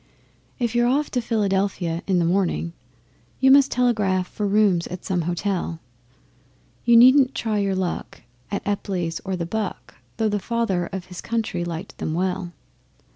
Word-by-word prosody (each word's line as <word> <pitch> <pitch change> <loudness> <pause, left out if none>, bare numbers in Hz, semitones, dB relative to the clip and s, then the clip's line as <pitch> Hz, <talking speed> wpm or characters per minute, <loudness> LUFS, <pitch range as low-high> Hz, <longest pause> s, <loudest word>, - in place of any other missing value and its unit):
If 235 -3 -1
you're 240 0 +3
off 285 +4 +1
to 250 - 0
Philadelphia 195 -6 0
in 190 -2 +2
the 170 - +2
morning, 175 -2 0 0.7
You 265 0 +5
must 275 0 +6
telegraph 210 -7 +1
for 210 +1 -3
rooms 200 -4 +3
at 180 - -8
some 180 -2 0
Hotel. 175 -2 -2 1.0
You 235 -1 +6
needn't 260 +2 +6
try 215 -2 -1
your 195 -1 0
luck 185 -8 -4 0.3
at 200 -1 -4
Epply's 180 -5 -2
or 190 -1 -2
the 170 -2 -3
'Buck,' 210 +2 -4 0.2
Though 220 -1 +1
the 205 0 0
Father 200 -6 -1
of 190 -2 -6
his 180 -1 -9
Country 220 -6 -2
liked 175 +2 -6
them 155 - -2
well. 180 0 -2
195 Hz, 160 wpm, -23 LUFS, 180-230 Hz, 1.0 s, must